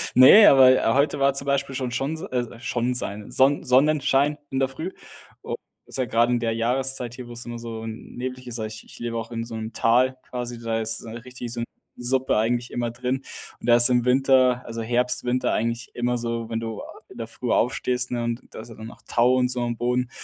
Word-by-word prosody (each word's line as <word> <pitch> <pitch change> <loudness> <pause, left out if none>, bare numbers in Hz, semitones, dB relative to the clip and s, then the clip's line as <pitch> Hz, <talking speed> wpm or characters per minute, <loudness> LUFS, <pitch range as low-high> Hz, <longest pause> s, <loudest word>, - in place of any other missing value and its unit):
Ne, 135 +12 +9
aber, 130 -1 +8
äh, - - 0
heute 140 +1 +2
war 140 0 +3
zum 140 0 -5
Beispiel 140 -1 -1
schon 125 -2 -2
schon 140 +5 -2
so 190 - -7
äh, 120 -2 -3
schon 120 0 -1
sein 105 -3 -4
Sonn 135 +2 +3
Sonnenschein 140 +2 +3
in 135 - -2
der 135 - +2
Früh 160 +8 -6 0.5
u - - -3 0.3
ist - - -8
ja 130 - +1
gerade 115 +2 +2
in 120 - +2
der 115 -1 -1
Jahreszeit 125 +1 -1
hier, 125 -2 -9
wo‘s 120 0 -7
immer 120 0 -6
so, 115 -1 -7
hm, 110 0 -8
nebliger 125 0 -5
ist. 115 -1 -5
Ich 110 0 -6
ich - - -14
lebe 120 -1 -3
auch 115 +1 -5
in 115 0 -3
so 115 -1 -8
‘nem 110 0 -5
Tal 130 +3 +2
quasi, 120 -1 -5
da 115 -1 -1
ist 110 +1 -2
so 115 - -10
richtig 120 +1 -8
so 120 -1 -4
‘n - - -2 0.4
Suppe 130 -1 +1
eigentlich 120 +2 0
immer 120 -1 -2
drin 125 +2 -3 0.4
und - - -8
da 120 - +8
ist 120 +1 +6
im 125 -1 +2
Winter, 130 -1 +4
also, 115 0 -5
Herbst, 125 +2 0
Winter, 125 +1 +1
eigentlich 115 +1 -2
immer 120 0 0
so, 115 -1 -3
wenn 115 0 -2
du, 115 -2 -5
ah, - - -11
in - - -13
der - - -5
Früh - - -4
aufstehst, 125 0 0
ne, 120 -1 -1
und 120 +1 -2
da - - -8
ist 115 - -12
ja 115 - -11
dann 110 +1 -9
noch - - -13
Tau 120 +2 +3
und 125 -1 +2
so 125 -1 -2
am 120 0 -2
Boden, 125 +1 0
120 Hz, 240 wpm, -24 LUFS, 115-130 Hz, 0.5 s, Ne